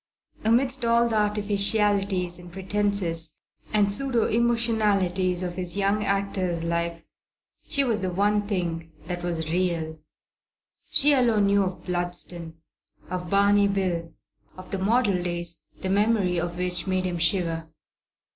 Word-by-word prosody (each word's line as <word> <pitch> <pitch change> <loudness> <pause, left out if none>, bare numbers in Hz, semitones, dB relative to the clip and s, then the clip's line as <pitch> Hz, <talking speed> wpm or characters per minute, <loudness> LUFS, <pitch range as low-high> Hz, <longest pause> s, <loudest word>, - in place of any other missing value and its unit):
Amidst 250 +4 +2
all 235 0 +3
the 225 - -1
artificialities 205 -3 +1
and 175 0 -12
pretences 190 -4 +1 0.3
and 210 -1 +3
pseudo 235 +3 +2
emotionalities 210 -6 +1
of 180 0 -4
his 180 0 -3
young 200 +1 +1
actor's 195 -4 -1
life, 170 0 -2 0.6
she 280 -2 +2
was 225 -5 0
the 185 - -1
one 205 +2 +1
thing 170 -5 -3
that 175 0 -4
was 165 -2 -3
real. 165 -3 -1 0.9
She 295 0 +5
alone 235 -6 +3
knew 200 0 +3
of 185 -1 -4
Bludston, 175 -2 -3 0.6
of 180 -1 -4
Barney 200 +1 +4
Bill, 180 -4 -2 0.5
of 185 0 -11
the 195 - -1
model 205 -2 +2
days 175 -1 -3 0.2
the 190 - -3
memory 200 -3 +2
of 175 0 -4
which 180 +1 -3
made 185 -1 0
him 175 -2 -2
shiver. 165 -2 0
190 Hz, 135 wpm, -25 LUFS, 175-210 Hz, 0.9 s, She